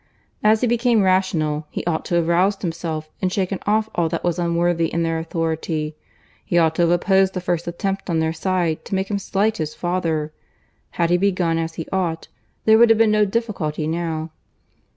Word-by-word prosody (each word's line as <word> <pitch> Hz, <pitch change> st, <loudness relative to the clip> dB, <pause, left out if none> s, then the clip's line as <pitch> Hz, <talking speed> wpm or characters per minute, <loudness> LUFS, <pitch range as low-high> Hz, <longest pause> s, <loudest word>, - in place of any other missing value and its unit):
As 215 Hz, +1 st, +4 dB
he 250 Hz, -, +2 dB
became 235 Hz, -2 st, +2 dB
rational, 160 Hz, -5 st, +1 dB
he -, -, -5 dB
ought 165 Hz, -2 st, -1 dB
to 175 Hz, -, -1 dB
have 170 Hz, -1 st, +2 dB
roused 185 Hz, +4 st, +2 dB
himself 165 Hz, -2 st, -3 dB
and 185 Hz, -1 st, 0 dB
shaken 190 Hz, -1 st, -1 dB
off 215 Hz, +1 st, +2 dB
all 170 Hz, -2 st, +1 dB
that -, -, -3 dB
was 175 Hz, 0 st, 0 dB
unworthy 170 Hz, -1 st, +1 dB
in 170 Hz, -, 0 dB
their 165 Hz, 0 st, 0 dB
authority. 160 Hz, -1 st, -2 dB, 0.5 s
He 175 Hz, -, 0 dB
ought 160 Hz, -2 st, +4 dB
to -, -, +2 dB
have 170 Hz, -, +4 dB
opposed 190 Hz, +2 st, +3 dB
the -, -, 0 dB
first 175 Hz, -1 st, -2 dB
attempt 195 Hz, +3 st, -3 dB
on 165 Hz, -, +1 dB
their 160 Hz, 0 st, 0 dB
side 175 Hz, -2 st, -1 dB
to -, -, -3 dB
make 190 Hz, +2 st, -2 dB
him 200 Hz, -, 0 dB
slight 205 Hz, +3 st, 0 dB
his 155 Hz, -2 st, -4 dB
father. 165 Hz, -4 st, -2 dB, 0.6 s
Had 170 Hz, 0 st, +2 dB
he 175 Hz, -, +5 dB
begun 180 Hz, -4 st, +1 dB
as 165 Hz, 0 st, -3 dB
he 165 Hz, -, -5 dB
ought, 170 Hz, -4 st, -2 dB, 0.4 s
there 220 Hz, 0 st, +6 dB
would 235 Hz, 0 st, +7 dB
have 225 Hz, -, +5 dB
been 225 Hz, -1 st, +4 dB
no 210 Hz, 0 st, +4 dB
difficulty 195 Hz, -8 st, -2 dB
now." 160 Hz, 0 st, -3 dB
175 Hz, 200 wpm, -21 LUFS, 165-195 Hz, 0.6 s, would